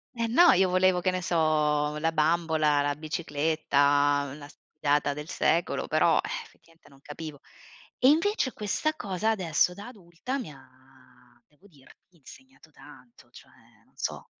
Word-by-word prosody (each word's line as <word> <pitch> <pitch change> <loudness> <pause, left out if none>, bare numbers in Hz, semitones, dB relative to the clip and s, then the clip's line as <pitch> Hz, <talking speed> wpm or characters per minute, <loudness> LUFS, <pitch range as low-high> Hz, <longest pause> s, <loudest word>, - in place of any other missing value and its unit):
Eh 230 -1 -1
no, 330 +10 +6
io 185 +1 +3
volevo 185 0 +2
che 185 +1 +1
ne 185 0 -3
so, 150 -3 +1
la 160 +2 -1
bambola, 155 -2 +1
la 145 0 -1
bicicletta, 145 -2 0
la 145 -1 -11
sfilata 145 -1 -2
del 150 0 -8
secolo, 170 +2 0
però, 155 +1 +3
eh, - - -3 0.2
effettivamente 165 0 -23
non 135 -1 -20
capivo. 145 0 -9 0.6
E 255 - +4
invece 330 - +1
questa 215 +9 -2
cosa 205 - -2
adesso 180 -5 +1
da 200 +3 -10
adulta 210 +3 -7
mi 225 -11 -7
ha 135 -2 -17 0.8
devo 150 +7 -25
dirti, 170 +1 -22
insegnato 260 - -17
tanto, 150 +12 -18
cioè - - -17 0.3
non - - -34
so. - - -5
160 Hz, 150 wpm, -27 LUFS, 150-190 Hz, 0.8 s, no